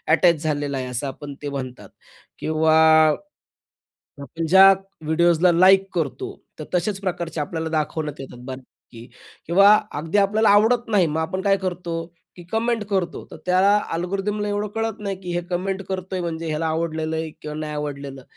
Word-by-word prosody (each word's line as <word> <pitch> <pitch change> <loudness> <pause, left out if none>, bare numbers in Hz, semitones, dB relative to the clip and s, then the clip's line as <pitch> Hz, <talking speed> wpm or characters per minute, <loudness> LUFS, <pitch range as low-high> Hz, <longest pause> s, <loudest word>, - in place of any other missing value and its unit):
Attach 170 -2 +3
झालेलं 145 -2 -1
आहे 130 -1 -4
असं 125 +2 -3
आपण 140 +2 -7
ते 145 - -3
म्हणतात 130 -3 -7 0.5
किंवा 155 0 +2 1.5
आपण 165 +3 -5
ज्या 190 +2 +8 0.3
व्हिडिओजला 170 +2 +3
लाइक 190 +3 +6
करतो, 160 -6 -3 0.3
तर 155 - -6
तशाच 190 +3 0
प्रकारचे 175 -4 -3
आपल्याला 160 +2 -3
दाखवण्यात 155 -1 -2
येतात 130 -2 -9
बऱ्यापैकी 130 -2 -11 0.4
किंवा 200 +5 +6 0.2
अगदी 165 +6 -1
आपल्याला 210 +2 +3
आवडत 225 +4 +3
नाही, 200 -6 +3
मग 155 +1 -2
आपण 185 +4 -3
काय 195 -1 +3
करतो, 180 -2 -4 0.4
की 175 - -10
कमेंट 225 0 0
करतो 190 -3 -2
तर - - -9
त्याला 190 +3 +4 0.2
अल्गोरिथमला 195 +4 -2
एवढं 205 +1 -2
कळत 225 -1 -2
नाही 200 -2 -3
की 180 - -6
हे 175 - 0
कमेंट 190 +2 -2
करतोय 185 0 -4
म्हणजे 165 -1 -4
ह्याला 155 +1 -1
आवडलेलं 160 0 -2
आहे 160 0 -3
किंवा 150 0 -6
नाही 155 -1 -4
आवडलेलं. 140 -2 -6
170 Hz, 160 wpm, -22 LUFS, 155-195 Hz, 1.5 s, ज्या